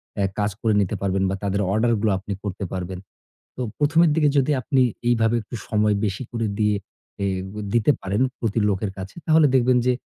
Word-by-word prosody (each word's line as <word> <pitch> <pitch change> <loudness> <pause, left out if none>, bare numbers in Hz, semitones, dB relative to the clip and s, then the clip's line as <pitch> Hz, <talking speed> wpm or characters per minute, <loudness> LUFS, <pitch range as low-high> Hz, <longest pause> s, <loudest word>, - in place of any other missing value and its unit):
অ্যা 100 - +1
কাজ 105 0 +1
করে 110 -2 +2
নিতে 95 - -1
পারবেন 95 -1 0
বা 95 - -1
তাদের 100 0 0
অর্ডারগুলো 110 -1 +2
আপনি 100 +2 -5
করতে 100 -1 -4
পারবেন। 90 0 -4 0.6
তো - - -5 0.2
প্রথমের 160 +3 +4
দিকে 150 -2 +3
যদি 140 +2 +3
আপনি 135 0 +2 0.3
এইভাবে 115 -1 +3
একটু 110 +3 -9
সময় 105 -1 +2
বেশি 100 +4 -3
করে 115 -2 -1
দিয়ে 105 -1 +2 0.5
এ - - +1 0.3
গ - - -12 0.2
দিতে 120 +4 +4
পারেন 100 +4 -1 0.2
প্রতি 115 -1 0
লোকের 100 0 -1
কাছে 95 0 -7
তাহলে 160 -2 +5
দেখবেন 125 0 +4
যে 125 - +4
110 Hz, 190 wpm, -23 LUFS, 100-125 Hz, 0.6 s, তাহলে